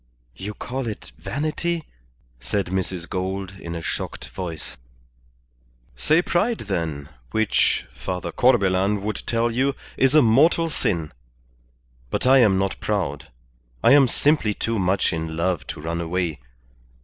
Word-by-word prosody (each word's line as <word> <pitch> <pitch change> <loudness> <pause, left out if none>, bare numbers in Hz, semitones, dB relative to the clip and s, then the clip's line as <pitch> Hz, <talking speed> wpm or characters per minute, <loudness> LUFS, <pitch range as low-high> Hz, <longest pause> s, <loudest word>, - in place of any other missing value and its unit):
"You 105 - -6
call 130 0 -4
it 105 - -6
vanity," 155 +4 -2 0.6
said 70 +12 -1
Mrs. 95 -2 -2
Gould, 95 0 -3
in 85 -2 -6
a 85 - -5
shocked - - -4
voice. 85 -8 -6 1.2
"Say 155 - +3
pride, 210 +7 +1
then, 80 -8 -3 0.2
which 110 -1 +2
Father 90 +9 -4
Corbelan 100 -4 +3
would 105 -1 -3
tell 115 0 +1
you, 135 +4 +1 0.2
is 135 +2 +3
a 155 - +7
mortal 155 +8 +4
sin. 85 - -1 1.0
But - - -2
I 135 +1 +7
am 105 -6 +5
not 95 0 -1
proud. 80 -8 -2 0.6
I - - +6
am 140 -1 +7
simply 135 -5 +2
too 115 -1 -1
much 95 0 +2
in 80 -1 -3
love 85 -4 0
to - - -6
run 85 +2 -3
away. 85 -1 -2
100 Hz, 135 wpm, -23 LUFS, 85-130 Hz, 1.2 s, a